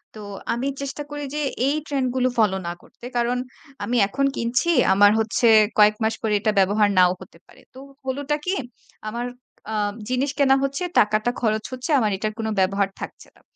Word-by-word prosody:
তো 215 Hz, -, -9 dB, 0.3 s
আমি 240 Hz, +3 st, -2 dB
চেষ্টা 280 Hz, +1 st, -5 dB
করি 290 Hz, 0 st, -5 dB
যে 300 Hz, -, -1 dB, 0.3 s
এই 285 Hz, -, +1 dB
ট্রেন্ড 275 Hz, -3 st, 0 dB
গুলো 255 Hz, 0 st, +2 dB
ফলো 210 Hz, -4 st, +3 dB
না 170 Hz, -, -2 dB
করতে। -, -, -16 dB
কারণ 240 Hz, +1 st, +1 dB, 0.5 s
আমি 245 Hz, -, 0 dB
এখন 275 Hz, +6 st, -1 dB
কিনছি 240 Hz, +8 st, 0 dB, 0.2 s
আমার 205 Hz, +1 st, +6 dB
হচ্ছে 220 Hz, +2 st, +1 dB, 0.3 s
কয়েক 210 Hz, 0 st, +6 dB
মাস 220 Hz, +1 st, +1 dB
পরে 220 Hz, -2 st, 0 dB
এটা 215 Hz, +1 st, +1 dB
ব্যবহার 205 Hz, +2 st, +3 dB
নাও 180 Hz, -1 st, +6 dB
হতে 185 Hz, -, -13 dB
পারে। -, -, -19 dB
তো 260 Hz, -, -12 dB, 0.3 s
হলোটা 280 Hz, +3 st, -1 dB
কি 365 Hz, -, 0 dB, 0.5 s
আমার 235 Hz, +3 st, -3 dB, 0.5 s
আ -, -, -3 dB, 0.4 s
জিনিস 260 Hz, +2 st, 0 dB
কেনা 270 Hz, -1 st, +5 dB
হচ্ছে, 275 Hz, +5 st, -2 dB, 0.2 s
টাকাটা 215 Hz, +3 st, +2 dB
খরচ 220 Hz, -2 st, 0 dB
হচ্ছে। 255 Hz, +4 st, -6 dB
আমার 215 Hz, -4 st, +1 dB
এটার 215 Hz, +2 st, -3 dB
কোনো 220 Hz, 0 st, -2 dB
ব্যবহার 195 Hz, +1 st, +1 dB
থাকছে -, -, -8 dB
না। -, -, -24 dB
235 Hz, 185 wpm, -23 LUFS, 210-265 Hz, 0.5 s, আমার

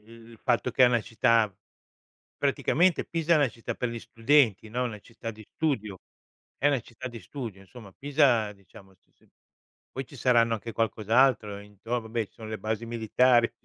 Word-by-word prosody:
il 115 Hz, +1 st, -15 dB
fatto 125 Hz, +1 st, +1 dB
che 130 Hz, +2 st, +5 dB
è -, -, +7 dB
una 120 Hz, -1 st, +3 dB
città 115 Hz, -2 st, +2 dB, 0.9 s
Praticamente 175 Hz, +2 st, +2 dB
Pisa 165 Hz, 0 st, 0 dB
è -, -, +6 dB
una 145 Hz, -4 st, +3 dB
città 115 Hz, 0 st, -6 dB
per 125 Hz, -, -3 dB
gli 115 Hz, -, -5 dB
studenti 115 Hz, -3 st, +2 dB
no, 125 Hz, +3 st, -1 dB
una 115 Hz, -4 st, -4 dB
città 115 Hz, +1 st, -8 dB
di 110 Hz, 0 st, -13 dB
studio. 110 Hz, -11 st, -1 dB, 0.6 s
È 145 Hz, -, +2 dB
una 140 Hz, -3 st, +2 dB
città 120 Hz, +2 st, -9 dB
di 120 Hz, -2 st, -9 dB
studio, 110 Hz, -1 st, -7 dB
insomma, 100 Hz, +2 st, -13 dB
Pisa 135 Hz, -7 st, +2 dB
diciamo 95 Hz, 0 st, -17 dB
si -, -, -41 dB
si -, -, -30 dB, 0.6 s
poi 135 Hz, -, -5 dB
ci 140 Hz, -, -14 dB
saranno 115 Hz, -3 st, +3 dB
anche 115 Hz, +1 st, -4 dB
qualcos'altro 115 Hz, -1 st, +2 dB
intor 105 Hz, +4 st, -5 dB
vabbè 110 Hz, -1 st, -3 dB
ci -, -, -37 dB
sono 110 Hz, -1 st, -9 dB
le 110 Hz, -, -5 dB
basi 110 Hz, +1 st, -3 dB
militari 120 Hz, +1 st, +3 dB
115 Hz, 180 wpm, -27 LUFS, 110-125 Hz, 0.9 s, è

